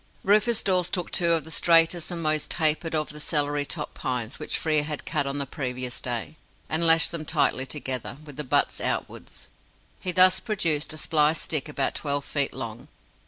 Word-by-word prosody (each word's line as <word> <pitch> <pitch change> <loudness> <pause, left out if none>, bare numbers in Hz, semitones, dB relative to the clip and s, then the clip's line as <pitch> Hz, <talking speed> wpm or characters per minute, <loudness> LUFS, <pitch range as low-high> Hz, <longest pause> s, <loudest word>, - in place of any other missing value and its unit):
Rufus 215 +4 +2
Dawes 180 -2 +1
took 180 -2 -3
two 170 -2 +2
of 165 -3 +1
the 160 - -10
straightest 165 0 +3
and 170 -2 -4
most 155 -1 +1
tapered 160 0 +1
of 155 -1 -1
the 150 - -10
celery 145 -1 0
top 150 -1 -4
pines 125 -1 -4
which - - -1
Frere 155 -2 +2
had 150 0 -5
cut 140 - -1
on 140 +1 -3
the 140 - -1
previous 125 -3 -4
day, 125 +5 -4 0.3
and 165 +2 +2
lashed 165 0 +6
them 165 -2 -5
tightly 140 -4 0
together, 130 -3 -4
with 145 -3 -11
the 150 - -4
butts 130 - 0
outwards. - - -4 0.5
He 185 - -2
thus 185 +1 +6
produced 170 -9 -1
a 155 - -7
spliced 155 0 +1
stick 155 -2 +1
about 140 -2 -1
twelve 145 -1 -2
feet 140 -2 -1
long. - - -7
155 Hz, 190 wpm, -25 LUFS, 145-165 Hz, 0.5 s, lashed